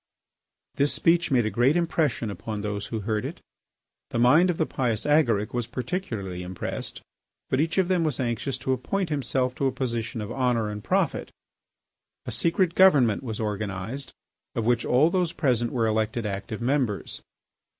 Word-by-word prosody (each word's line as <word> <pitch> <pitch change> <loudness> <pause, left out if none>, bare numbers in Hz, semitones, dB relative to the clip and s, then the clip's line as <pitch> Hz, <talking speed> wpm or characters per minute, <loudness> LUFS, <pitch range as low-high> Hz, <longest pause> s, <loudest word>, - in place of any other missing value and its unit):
This 140 +1 +3
speech 170 0 +2
made 125 -4 +3
a 110 - -1
great 125 - +3
impression 155 -9 0
upon 105 +1 -5
those 100 -1 -3
who 110 -2 -3
heard 105 +1 -1
it. - - -5 0.7
The - - -3
mind 150 +10 +5
of 175 - 0
the 160 - +2
pious 120 -8 -1
Agaric 120 -9 +2
was 120 -2 -1
particularly 115 - -4
impressed. 90 0 -5 0.5
But 130 - +3
each 165 +4 -1
of 190 -2 +3
them 180 -2 +2
was 155 -6 -1
anxious 125 +1 -1
to 130 - +2
appoint 180 +8 -2
himself 130 -3 0
to 135 - +1
a - - +1
position 120 -3 -3
of 105 +1 -5
honour 120 -4 0
and 105 0 -6
profit. - - 0 1.0
A - - -4
secret 170 +1 +2
government 140 - +5
was 115 -5 -5
organised 105 +4 -3 0.4
of 115 - -1
which 120 0 +2
all 145 +7 +4
those 180 -3 +1
present 120 -5 +1
were 120 -3 +1
elected 110 +1 0
active 105 +3 -4
members. 125 -5 -1
125 Hz, 170 wpm, -26 LUFS, 110-150 Hz, 1.0 s, mind